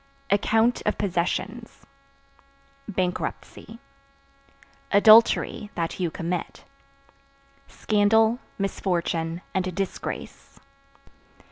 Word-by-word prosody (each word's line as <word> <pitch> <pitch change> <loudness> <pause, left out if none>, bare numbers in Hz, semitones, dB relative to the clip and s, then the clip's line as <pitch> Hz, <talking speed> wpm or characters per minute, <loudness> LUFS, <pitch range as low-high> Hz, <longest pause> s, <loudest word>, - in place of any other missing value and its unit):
Account 225 +4 +2
(Of 210 - 0
possessions) 200 +5 -3 1.0
bankruptcy. 185 +3 -4 1.1
Adultery 215 0 +5
(That 165 +1 -3
you 175 -2 0
commit) 175 +1 -5 1.0
scandal, 220 +2 +2 0.2
misfortune 175 -3 -2
and 185 -2 -2
disgrace. 195 -1 -6
195 Hz, 65 wpm, -25 LUFS, 180-215 Hz, 1.1 s, Adultery